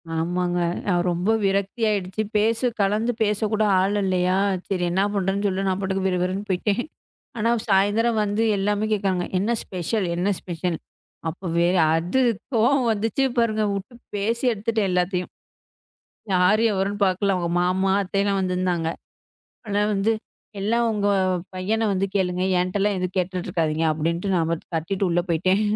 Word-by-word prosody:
ஆமாங்க. 175 +2 0 0.3
ஆ, - - +3 0.2
ரொம்ப 175 +4 -1 0.2
விரக்தியா 200 +4 0
ஆயிடுச்சு. 190 +1 -2 0.2
பேச, 225 +2 +2 0.2
கலந்து 215 +4 +1
பேசக் 210 0 +1
கூட 215 0 +2 0.2
ஆள் 195 +2 +1
இல்லையா? 185 -1 +1 0.3
"செரி 185 -3 -1
என்ன 190 +3 +2
பண்றதுன்னு" 200 +1 0
சொல்ல 195 0 -1
நான் 190 0 0
பாட்டுக்கு 190 0 -1
விறுவிறுன்னு 185 +2 -1
போயிட்டேன். 200 +5 0 0.6
ஆனா, 225 +2 +1 0.2
சாயந்தரம் 210 +4 +3
வந்து 205 +2 0
எல்லாமே 205 +2 0
கேக்கறாங்க. 190 -3 0
என்ன 210 +5 0
ஸ்பெஷல்? 185 +3 -2
என்ன 180 +3 0
ஸ்பெஷல்? 175 -1 -3 0.5
அப்ப 175 +4 -10 0.2
வேற 175 +2 +3 0.2
அது 175 +10 0 0.3
கோவம் 245 +2 +3
வந்துச்சு 225 +5 0
பாருங்க. 220 -2 +2
உட்டுப் 235 +5 -10
பேசி 230 +5 -1
எடுத்துட்டேன் 220 -1 -1
எல்லாத்தையும். 180 0 0 1.0
யாரு 190 +5 +4
எவரென்னு 200 +2 -1
பாக்கல. 190 +1 +1
அவங்க 170 -1 -2
மாமா, 190 +2 +1
அத்தை 195 +1 -1
எல்லாம் 200 -1 +1
வந்திருந்தாங்க. 180 -3 0 0.8
ஆனா, 205 0 0
"வந்து 200 +3 +2 0.5
எல்லாம் 230 +4 +1
உங்க 205 -1 0 0.5
பையனை 215 +5 -1
வந்து 195 +1 0
கேளுங்க. 180 -1 0 0.2
என்ட்டல்லாம் 200 +2 0
எதும் 180 0 -3
கேட்டுட்டு 180 -1 -2
இருக்காதீங்க" 160 -1 0
அப்படின்ட்டு 170 +5 -1
நான் 165 -1 +1 0.2
கத்திட்டு 185 +4 -1
உள்ள 175 +1 +2
போயிட்டேன். 185 +5 +2
195 Hz, 145 wpm, -23 LUFS, 180-210 Hz, 1.0 s, யாரு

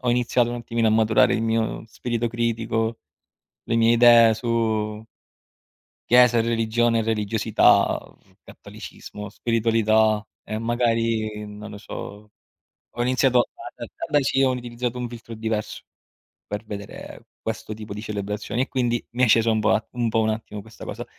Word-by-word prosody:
ho 125 - +1
iniziato 120 0 +1
un - - -3
attimino 115 -1 -1
a 110 - +4
maturare 110 0 +4
il 110 - -1
mio 115 0 -1
spirito 120 +1 -2
critico, 115 -1 -1 0.7
le 115 - -2
mie 115 0 +4
idee 115 -1 +7
su 110 -2 -1 1.0
chiesa, 125 -1 +6
religione, 115 0 +1
religiosità, 110 -1 +2
uhm, - - -22
cattolicesimo, 105 0 -10
spiritualità 110 -1 +2 0.2
e 110 - -5
magari, 115 -2 0
non 105 +1 -9
lo 105 - -9
so, 105 0 -9 0.6
ho 120 - -4
iniziato 125 0 +3 0.3
da - - -7
da - - -8
da 145 - +4
sì, 135 0 +1
ho 130 - +3
utilizzato 125 -1 -4
un 125 - -3
filtro 115 -1 -10
diverso 110 -1 -3 0.7
per 105 +2 -5
vedere 100 -2 -9 0.2
questo 110 -1 -4
tipo 105 -1 -8
di 105 - -6
celebrazioni, 105 +3 -3
e - - -3
quindi 120 -3 -1
mi 125 +2 +2
è - - +1
scesa 115 +1 +4
un 110 -1 +1
po' 110 +1 +1
un 120 -2 -1
po' 115 0 +1
un 110 0 +1
attimo 110 -1 -5
questa 110 +1 -12
cosa. - - -6
115 Hz, 155 wpm, -23 LUFS, 110-120 Hz, 1.0 s, idee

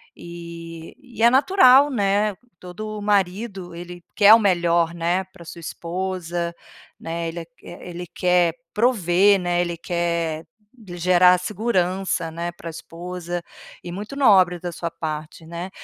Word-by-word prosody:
e 170 -1 -10
e 240 -5 -6
é 235 - +8
natural, 275 -1 +6
né? 205 -3 +1 0.2
Todo 210 +4 -7
marido, 195 -2 -1
ele 175 0 -9
quer 210 0 +8
o 230 - +8
melhor, 170 -4 +2
né, 175 +2 0
pra 185 -2 -16
sua 170 - -10
esposa, 175 0 -4 0.5
né? 165 0 -4
Ele 170 +1 -6 0.2
e - - -11
ele 175 0 -8
quer 175 -1 +1 0.2
prover, 200 -4 +3
né, 175 -1 0
ele 170 -1 -3
quer 170 -2 -2 0.4
lhe 175 -3 -9
gerar 180 +1 +5
segurança, 185 -4 -1
né, 170 +1 -4
pra 170 -1 -9
esposa. 175 +1 -6 0.4
E 175 - -7
muito 205 +9 -7
nobre 190 -9 +4
da 175 0 -5
sua 170 0 -4
parte, 155 +1 -6
né, 170 +3 -6
175 Hz, 140 wpm, -22 LUFS, 170-200 Hz, 0.5 s, é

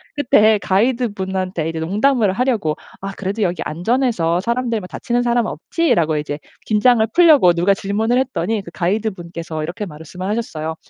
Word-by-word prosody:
그때 220 -6 +4
가이드분한테 190 -5 -1
이제 165 0 -4
농담을 210 +5 +2
하려고 220 - 0 0.3
"아 195 0 -5
그래도 200 +3 -3
여기 180 -2 0
안전해서 180 - 0
사람들 235 0 -1
뭐 180 - -9
다치는 245 +4 -2
사람은 240 -1 +1
없지?"라고 170 - 0
이제 150 0 -3 0.3
긴장을 220 +2 +4
풀려고 305 - +6
누가 175 +4 +2
질문을 220 +5 0
했더니 225 -5 -1
그 180 - -11
가이드분께서 170 -4 -3
이렇게 175 +6 -4
말씀을 160 +4 -8
하셨어요. 160 -8 -3
200 Hz, 400 characters per minute, -19 LUFS, 170-235 Hz, 0.3 s, 풀려고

